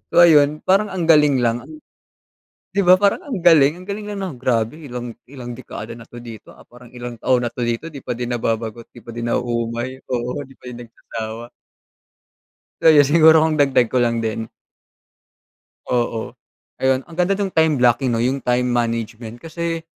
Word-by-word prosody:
So - - -6
ayun, 150 -2 +4
parang 200 +3 +3
ang 185 -3 -3
galing 150 -6 +4
lang 115 +1 0
an 155 +5 -12 1.0
di 200 - +2
ba 180 +1 +7
parang 200 0 +2
ang 260 -8 -4
galing? 165 -2 +5
Ang 185 - -12
galing 205 +1 -5
lang 205 - -5
nang 140 -8 -8
grabe, 115 -1 0
ilang 125 -4 -7 0.2
ilang 120 -3 -8
dekada 115 -2 -8
na 120 - -12 0.2
dito 115 -3 -11
ah, - - -18
parang 120 0 -16
ilang 120 -1 -7
taon 125 -2 +2
na - - -3
dito 120 +5 -2
di 135 - -8
pa 125 - -4
din 120 - -3
nababagot, 115 -1 -3
di - - -15
pa 115 - -8
din 120 0 -4
nauumay 120 +2 -2
oo 125 +3 -2
di 135 -1 -15
pa - - -25
din 120 -1 -8
nagsasawa. 115 0 -8 1.4
So 160 - +6
yun 145 -2 +7
siguro 160 +1 +6
kung 155 -2 +1
dagdag 135 -3 +3
ko 125 - +3
lang 115 -1 0
din. 110 0 -3 1.4
Oo. 120 -2 -2 0.4
Ayun 130 0 +2
ang 170 - -13
ganda 180 +2 +2
nung 200 -2 -2
time 160 -2 +3
blocking 125 +1 +3
no, 115 - 0
yung 130 +3 0
time 125 0 +1
management 115 -1 -2
kasi 165 0 -4
125 Hz, 185 wpm, -20 LUFS, 120-155 Hz, 1.4 s, ba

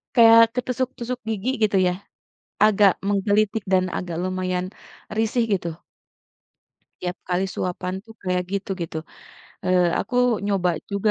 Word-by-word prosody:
Kayak 230 -1 +8 0.2
ketusuk-tusuk 250 0 -3
gigi, 220 +3 -2
gitu 205 -2 +3
ya. 180 - +1 0.7
Agak 205 -3 +5 0.2
menggelitik 205 +1 +1
dan 185 -1 +4
agak 175 -2 -5
lumayan 185 0 -2 0.5
risih, 225 +2 +1
gitu. 175 -3 0 1.3
Tiap 180 0 -3
kali 180 +2 +1
suapan 185 -1 -3
tuh 225 - -13
kayak 180 0 0
gitu, 200 +1 -3
gitu. 160 -1 -4 0.7
Eee, 180 -1 +3
aku 250 - -4 0.3
nyoba 195 -3 +1 0.2
juga 200 +2 +1
195 Hz, 125 wpm, -23 LUFS, 180-220 Hz, 1.3 s, Kayak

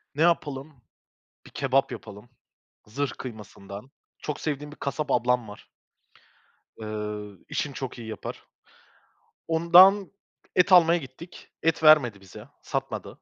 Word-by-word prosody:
Ne 155 - -2
yapalım, 145 -5 0 0.7
bir - - -14
kebap 135 0 +1
yapalım 105 +1 -10 0.6
zırh 135 +5 -2
kıymasından. 105 0 -9 0.3
Çok 150 -1 -5
sevdiğim 150 -1 -4
bir - - -13
kasap 145 +2 -3
ablam 125 -1 +1
var. 105 - -12 1.1
Iıı, 105 -2 -6
işini 145 -3 -3
çok 130 -1 -6
iyi 115 -1 -8
yapar. 110 - -7 1.0
Ondan 180 +4 +6 0.5
et 180 +1 +4
almaya 175 -1 +7
gittik, 145 +5 -12
et 165 0 +1
vermedi 130 -10 +6
bize, 95 -2 -13
satmadı. - - -4
135 Hz, 120 wpm, -26 LUFS, 110-160 Hz, 1.1 s, almaya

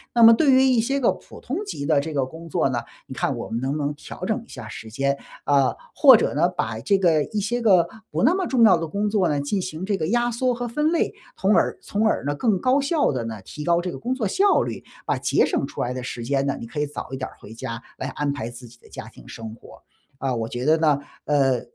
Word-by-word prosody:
那 235 - +6
么 230 - +10
对 280 +4 +4
于 260 0 +6
一 255 -3 +4
些 275 +5 0
个 250 - +3
普 - - -11
通 270 +6 -3
级 145 - -5
的 155 -2 +3
这 155 +2 -4
个 140 -3 +1
工 160 +5 -10
作 140 - +1
呢， 120 -2 -1 0.3
你 130 - -9
看 135 0 -1
我 115 - -6
们 115 - -2
能 130 +2 -2
不 145 - -1
能 145 -1 -1
调 150 - -10
整 220 +3 -1
一 - - -28
下 120 -4 -9
时 110 - -8
间， 140 +4 0 0.3
啊， 140 -2 +3 0.2
或 - - +8
者 - - +1
呢， - - +3
把 110 0 -3
这 195 - +2
个 165 -5 +3
一 215 - -3
些 240 +4 -1
个 185 -6 +5 0.2
不 - - -1
那 330 - +5
么 375 -1 -1
重 250 -3 +3
要 195 -6 +7
的 165 -1 -3
工 205 +5 -1
作 205 -4 +2
呢 145 -3 0
进 185 +7 -1
行 165 +2 -5
这 200 -1 0
个 155 - -2
压 240 +4 +1
缩 250 +2 0
和 240 0 -4
分 300 +7 0
类， 335 - +1 0.2
从 195 +2 +2
而 - - +2
从 215 +2 0
而 220 - 0
呢 145 - 0
更 210 - +1
高 260 +2 +3
效 290 - +1
的 125 -4 -3
呢 110 -3 -6
提 150 - -8
高 170 0 +3
这 180 0 -4
个 - - -8
工 250 +2 -2
作 245 -4 -2
效 390 - +3
率， - - -4 0.2
把 - - 0
节 - - +2
省 - - -1
出 - - -6
来 125 +1 -1
的 130 - -5
时 120 -1 -5
间 135 +2 0
呢 140 - 0
你 - - -7
可 130 +6 -6
以 150 - +1
早 145 - -7
一 130 - -4
点 130 - -4
儿 - - -18
回 110 - -11
家， 115 +1 -6 0.2
来 130 - -4
安 145 +1 -2
排 120 -5 -4
自 120 0 -11
己 120 - -17
的 - - -20
家 - - -8
庭 - - -16
生 110 -1 -8
活。 - - -16 0.4
啊， 135 -1 -1
我 115 -2 -2
觉 120 +2 -4
得 155 +2 +4
呢， 150 -3 +3 0.3
呃， 135 -4 +2
155 Hz, 300 characters per minute, -23 LUFS, -, 0.4 s, 么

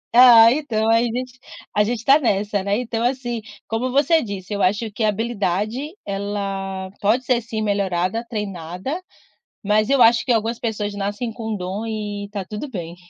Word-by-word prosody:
Ah 235 -2 +9
então 230 -7 0
a 230 +1 +5
gente 245 +1 -3 0.4
a 210 - +4
gente 235 +3 -1
está 270 +6 +5
nessa, 205 -5 0
né, 200 +1 0
então 235 -1 -2
assim, 240 -2 -1 0.3
como 230 +3 -1
você 295 +5 +3
disse, 200 -2 -6
eu 205 - -2
acho 205 +4 +1
que 210 +2 -3
a 215 - +4
habilidade 210 +1 -1 0.3
ela 195 -1 -4
pode 230 +6 +2
ser 250 -2 +2
sim 225 -2 -4
melhorada, 200 +1 0
treinada, 195 - -4 0.6
mas 210 +1 +2
eu 275 -2 +3
acho 230 0 +5
que 250 - +3
algumas 225 +1 0
pessoas 210 -3 -2
nascem 205 +4 -3
com 220 -1 -4
dom 195 +3 -4
e 210 -2 -4
está 200 -1 -5
tudo 210 +9 -6
bem. 175 -7 -6
215 Hz, 175 wpm, -21 LUFS, 200-240 Hz, 0.6 s, Ah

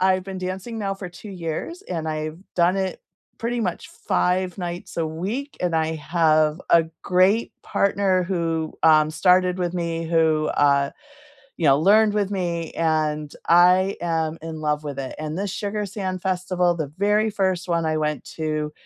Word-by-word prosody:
I've 185 0 +2
been 190 -1 -6
dancing 185 +5 -5
now 195 -2 -2
for 195 -2 -7
2 190 +4 -11
years, 180 - -5
and 165 - -4
I've 155 +1 -4 0.2
done 175 +2 +3
it 190 -1 -2 0.4
pretty 235 +1 -2
much 180 -6 -3 0.2
5 180 +1 +1
nights 175 +1 -6
a 165 -2 0
week, 205 - -4
and 175 -2 0
I 160 0 0
have 155 0 +2
a 165 -1 +6 0.2
great 190 +5 +3
partner 195 -2 +1
who, 165 -3 -1
um, 155 -1 +5
started 180 +1 +3
with 175 -1 -2
me, 165 -1 -2
who, 160 -2 +2
uh 140 -1 +3 0.7
you 165 - 0
know, 140 0 +6
learned 210 +5 +4
with 205 -1 0
me, 170 -4 -2
and 155 -2 0 0.2
I 180 +3 +5
am 165 -2 -1
in 160 -1 -6
love 150 -1 0
with 145 -2 -6
it. 135 -1 -5
And 155 +2 -4
this 200 -1 -2
Sugar 210 0 -3
Sand 185 -2 -4
Festival, 180 -1 0
the 155 -4 -4
very 210 +2 +2
1st 190 -3 -1
1 170 -1 +1
I 155 0 0
went 150 -1 -1
to, 155 -1 -2
175 Hz, 170 wpm, -23 LUFS, 160-190 Hz, 0.7 s, a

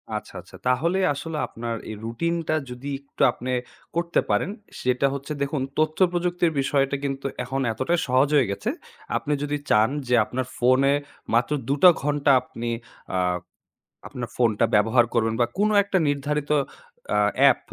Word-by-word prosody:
আচ্ছা, - - -6
আচ্ছা। - - -16
তাহলে 165 +9 +2
আসলে 155 +2 -5
আপনার 115 0 -5
এই 110 - -5
রুটিনটা 165 +7 -1
যদি 125 +3 -7
একটু 140 - -11
আপনে 130 +2 -5 0.4
করতে 170 0 +1
পারেন। 105 - +1 0.3
সেটা 125 +2 +2
হচ্ছে 140 +2 -5
দেখুন, 140 0 -1 0.2
তথ্যপ্রযুক্তির 175 +2 +1
বিষয়টা 135 0 +1
কিন্তু 135 -1 -3 0.2
এখন 135 +1 -2
এতটা 130 +9 0
সহজ 130 +2 +4
হয়ে 130 -7 +4
গেছে। 100 - -3 0.5
আপনি 150 - -2
যদি 145 0 -1
চান 105 +1 +4 0.2
যে 125 - +3
আপনার 130 +3 -3
ফোনে 130 +3 +4 0.4
মাত্র 120 +5 +2 0.2
২ 140 - +2
টা 180 - +11
ঘন্টা 145 0 +2
আপনি 120 +1 -6 0.5
আ - - +2 0.9
আপনার 120 -2 -6
ফোনটা 115 -2 +2
ব্যবহার 110 +4 +4
করবেন 115 -2 +1
বা - - +5
কোন 210 +2 +3
একটা 200 -1 0
নির্ধারিত 145 +1 -1 0.6
অ্যা - - +2 0.2
অ্যাপ, - - +6
140 Hz, 150 wpm, -24 LUFS, 125-155 Hz, 0.9 s, টা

